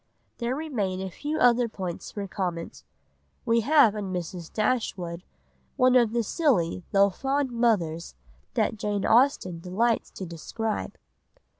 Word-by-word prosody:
There 240 Hz, +1 st, -1 dB
remain 225 Hz, -12 st, -2 dB
a 190 Hz, 0 st, -4 dB
few 295 Hz, -, -3 dB
other 245 Hz, -1 st, +4 dB
points 185 Hz, -5 st, -5 dB
for 200 Hz, -1 st, -5 dB
comment. 175 Hz, -4 st, -4 dB, 0.6 s
We 230 Hz, -1 st, +3 dB
have 260 Hz, -2 st, +5 dB
in 205 Hz, -3 st, -4 dB
Mrs. 175 Hz, -1 st, -5 dB
Dashwood 190 Hz, -7 st, -1 dB, 0.5 s
one 255 Hz, 0 st, +4 dB
of 235 Hz, -3 st, +5 dB
the 235 Hz, 0 st, +1 dB
silly 200 Hz, -, +1 dB
though 200 Hz, 0 st, +4 dB
fond 270 Hz, +5 st, -1 dB
mothers 185 Hz, -, 0 dB, 0.4 s
that -, -, +1 dB
Jane 205 Hz, -1 st, -1 dB
Austen 225 Hz, -8 st, +3 dB
delights 215 Hz, +7 st, 0 dB
to 190 Hz, -, -6 dB
describe. 210 Hz, +6 st, -4 dB
210 Hz, 135 wpm, -26 LUFS, 180-245 Hz, 0.6 s, have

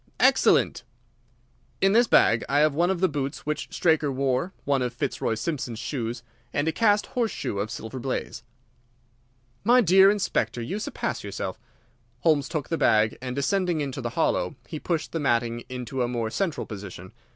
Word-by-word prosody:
"Excellent." -, -, +4 dB, 1.0 s
"In 195 Hz, -, +4 dB
this 235 Hz, +3 st, +5 dB
bag 115 Hz, -, +4 dB
I 145 Hz, +1 st, +3 dB
have 155 Hz, -1 st, +4 dB
one 170 Hz, +4 st, +2 dB
of 190 Hz, -2 st, -1 dB
the 185 Hz, -, +5 dB
boots 140 Hz, -4 st, -4 dB
which 150 Hz, 0 st, -2 dB
Straker 155 Hz, -4 st, +2 dB
wore, 135 Hz, +5 st, 0 dB
one 140 Hz, -2 st, +1 dB
of 125 Hz, -1 st, -2 dB
Fitzroy 115 Hz, -, -1 dB
Simpson's 120 Hz, -1 st, -3 dB
shoes, 120 Hz, -1 st, -4 dB, 0.3 s
and 145 Hz, +2 st, -1 dB
a -, -, +3 dB
cast 210 Hz, +1 st, +3 dB
horseshoe 225 Hz, -, -2 dB
of 105 Hz, +2 st, -2 dB
Silver 115 Hz, +2 st, -6 dB
Blaze." 120 Hz, -2 st, -4 dB, 1.2 s
"My 240 Hz, +4 st, +5 dB
dear 190 Hz, -2 st, +6 dB
Inspector, 200 Hz, -10 st, 0 dB
you 125 Hz, -, -3 dB
surpass -, -, -3 dB
yourself!" -, -, -5 dB, 0.6 s
Holmes 150 Hz, -4 st, +2 dB
took 150 Hz, -6 st, -3 dB
the 165 Hz, -, -1 dB
bag, 110 Hz, 0 st, +3 dB
and, 125 Hz, -1 st, -4 dB
descending 175 Hz, +4 st, 0 dB
into 135 Hz, -2 st, -3 dB
the 120 Hz, -, -2 dB
hollow, 160 Hz, -, +1 dB
he 155 Hz, -, -6 dB
pushed 165 Hz, -1 st, -2 dB
the 165 Hz, -, -2 dB
matting 120 Hz, -4 st, 0 dB
into 125 Hz, +1 st, -4 dB
a 120 Hz, -, +1 dB
more 115 Hz, -2 st, -2 dB
central 165 Hz, -, -2 dB
position. 95 Hz, -3 st, -9 dB
140 Hz, 170 wpm, -26 LUFS, 120-170 Hz, 1.2 s, dear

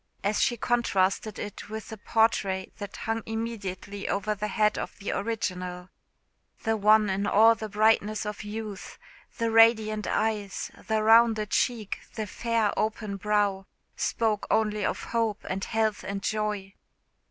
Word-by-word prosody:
as 205 Hz, +1 st, +1 dB
she 240 Hz, -2 st, +2 dB
contrasted 215 Hz, -3 st, +1 dB
it 205 Hz, 0 st, -7 dB
with 220 Hz, 0 st, -6 dB
the 220 Hz, -, -7 dB
portrait 200 Hz, -4 st, +1 dB
that 205 Hz, -1 st, -7 dB
hung 225 Hz, 0 st, -1 dB
immediately 210 Hz, -3 st, -4 dB
over 210 Hz, +2 st, 0 dB
the 210 Hz, 0 st, -3 dB
head 210 Hz, 0 st, +2 dB
of -, -, -5 dB
the 200 Hz, -, -4 dB
original. 180 Hz, -5 st, -3 dB, 0.7 s
The 225 Hz, 0 st, +1 dB
one 215 Hz, 0 st, +5 dB
in 195 Hz, +1 st, -1 dB
all 225 Hz, +3 st, +6 dB
the 220 Hz, -1 st, -6 dB
brightness 215 Hz, 0 st, +2 dB
of 210 Hz, 0 st, -5 dB
youth 210 Hz, -1 st, -7 dB, 0.4 s
the 230 Hz, -1 st, 0 dB
radiant 220 Hz, -2 st, +4 dB
eyes, 210 Hz, -3 st, -1 dB, 0.2 s
the 220 Hz, -1 st, +1 dB
rounded 225 Hz, -1 st, +5 dB
cheek, 225 Hz, -5 st, 0 dB, 0.2 s
the 220 Hz, -2 st, -2 dB
fair 225 Hz, 0 st, 0 dB
open 215 Hz, -2 st, -2 dB
brow, 205 Hz, -1 st, 0 dB, 0.3 s
spoke 220 Hz, -3 st, 0 dB
only 210 Hz, -1 st, +1 dB
of -, -, -2 dB
hope, 225 Hz, -3 st, -1 dB
and 190 Hz, +1 st, -3 dB
health, 220 Hz, -2 st, 0 dB
and 195 Hz, 0 st, -4 dB
joy. 210 Hz, -3 st, -2 dB
215 Hz, 145 wpm, -27 LUFS, 200-225 Hz, 0.7 s, all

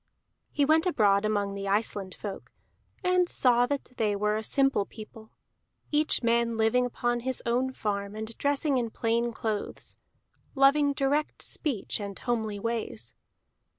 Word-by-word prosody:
He 290 Hz, -, +2 dB
went 315 Hz, +4 st, +3 dB
abroad 205 Hz, -, +3 dB
among 205 Hz, -2 st, 0 dB
the 200 Hz, 0 st, -5 dB
Iceland 200 Hz, -2 st, -1 dB
folk, 200 Hz, -2 st, -7 dB, 0.5 s
and 365 Hz, -1 st, +3 dB
saw 245 Hz, -1 st, +3 dB
that 285 Hz, -2 st, -3 dB
they 210 Hz, -2 st, +1 dB
were 210 Hz, +1 st, +1 dB
a 220 Hz, -, -2 dB
simple 270 Hz, -2 st, +2 dB
people, 220 Hz, +1 st, -12 dB, 0.6 s
each 300 Hz, -3 st, +1 dB
man 235 Hz, 0 st, +2 dB
living 225 Hz, +3 st, +3 dB
upon 240 Hz, 0 st, -1 dB
his 255 Hz, +1 st, -3 dB
own 250 Hz, +2 st, +1 dB
farm 200 Hz, -4 st, -3 dB
and 220 Hz, +1 st, -6 dB
dressing 285 Hz, -1 st, +1 dB
in 235 Hz, -2 st, -2 dB
plain 230 Hz, +1 st, 0 dB
clothes, 220 Hz, -2 st, -4 dB, 0.6 s
loving 280 Hz, +1 st, +4 dB
direct 280 Hz, +2 st, 0 dB
speech 260 Hz, -, -2 dB
and 200 Hz, -2 st, -6 dB
homely 220 Hz, -4 st, -2 dB
ways. 205 Hz, -, -3 dB
230 Hz, 145 wpm, -28 LUFS, 210-270 Hz, 0.6 s, loving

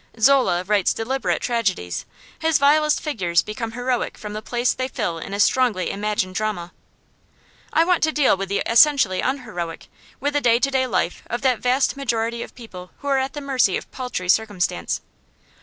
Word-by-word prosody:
Zola 250 Hz, -8 st, +4 dB
writes 200 Hz, 0 st, +1 dB
deliberate 260 Hz, +4 st, -1 dB
tragedies; 200 Hz, -, -1 dB, 0.3 s
his 320 Hz, -2 st, +2 dB
vilest 300 Hz, +2 st, +3 dB
figures 180 Hz, -, 0 dB
become 225 Hz, +1 st, -5 dB
heroic 245 Hz, 0 st, -2 dB
from 210 Hz, -1 st, -7 dB
the 215 Hz, -, -5 dB
place 240 Hz, +2 st, 0 dB
they 255 Hz, -, -3 dB
fill 210 Hz, -10 st, -3 dB
in 180 Hz, -, -8 dB
a 200 Hz, -, -3 dB
strongly 225 Hz, -4 st, +2 dB
imagined 205 Hz, -2 st, -2 dB
drama. 185 Hz, -4 st, -3 dB, 1.0 s
I 325 Hz, -, +4 dB
want 360 Hz, -1 st, +2 dB
to 315 Hz, -, 0 dB
deal 295 Hz, -7 st, +3 dB
with 195 Hz, 0 st, -5 dB
the 200 Hz, -, 0 dB
essentially 235 Hz, -6 st, +4 dB
unheroic, 215 Hz, -11 st, -4 dB, 0.3 s
with 290 Hz, +1 st, -1 dB
the 290 Hz, -, +1 dB
day 235 Hz, -2 st, +4 dB
to 275 Hz, +3 st, 0 dB
day 260 Hz, -1 st, +1 dB
life 180 Hz, -, -1 dB
of 240 Hz, +3 st, -4 dB
that 255 Hz, -3 st, +2 dB
vast 255 Hz, +3 st, +1 dB
majority 235 Hz, -3 st, -1 dB
of -, -, -8 dB
people 185 Hz, -7 st, -10 dB
who 285 Hz, -, -4 dB
are 270 Hz, -1 st, +3 dB
at 265 Hz, +1 st, -2 dB
the 290 Hz, -, -6 dB
mercy 260 Hz, -9 st, +2 dB
of -, -, -10 dB
paltry 250 Hz, -8 st, -4 dB
circumstance. 185 Hz, -, 0 dB
235 Hz, 180 wpm, -22 LUFS, 200-265 Hz, 1.0 s, Zola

